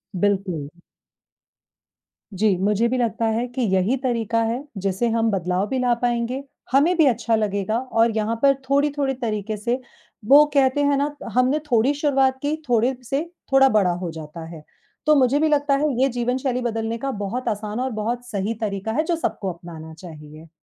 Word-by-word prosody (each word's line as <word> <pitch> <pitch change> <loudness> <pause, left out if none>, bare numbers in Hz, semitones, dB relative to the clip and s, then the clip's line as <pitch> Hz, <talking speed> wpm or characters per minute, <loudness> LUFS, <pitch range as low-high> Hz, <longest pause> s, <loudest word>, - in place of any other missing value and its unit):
बिल्कुल। 185 -6 -1 1.6
जी, 200 0 +2
मुझे 210 +3 +2
भी 255 +2 -1
लगता 230 -1 0
है 225 +2 0
कि 250 +1 -4
यही 190 +8 +2
तरीका 230 -3 0
है, 235 +4 -2
जिससे 195 +4 -1
हम 225 0 +1
बदलाव 185 +1 -1
भी 265 - -2
ला 245 -1 +2
पाएँगे, 245 +2 -1 0.3
हमें 300 +7 +4
भी 315 - +5
अच्छा 230 -1 +1
लगेगा 210 0 -1
और 230 -2 +1
यहाँ 220 +2 0
पर 275 - +6 0.2
थोड़ी-थोड़ी 280 -1 +1
तरीके 215 -1 -2
से 235 +5 -1 0.5
वो 290 +4 +8
कहते 275 0 +3
हैं 285 -1 +2
ना, 290 +1 -1 0.2
हमने 255 +4 +3
थोड़ी 240 +5 +3
शुरुआत 270 -3 +2
की 290 +2 0
थोड़े 240 +2 +3 0.2
से, 275 +3 0 0.3
थोड़ा 270 0 +6
बड़ा 200 -5 +3
हो 170 - -3
जाता 160 +1 -8
है। 160 -3 -10 0.4
तो 305 - +5
मुझे 270 0 +3
भी 315 - +3
लगता 290 -1 +2
है 300 +1 +1
ये 270 - +4
जीवनशैली 250 +1 -1
बदलने 225 -1 -2
का 275 +3 -3
बहुत 245 +5 -4
आसान 210 +1 -3
और 260 +1 -1
बहुत 235 +3 -3
सही 205 +1 -2
तरीका 200 0 -2
है 310 - +1
जो 335 +1 0
सबको 200 - -2
अपनाना 165 -2 -10
चाहिए। 155 -2 -12
235 Hz, 175 wpm, -22 LUFS, 205-270 Hz, 1.6 s, वो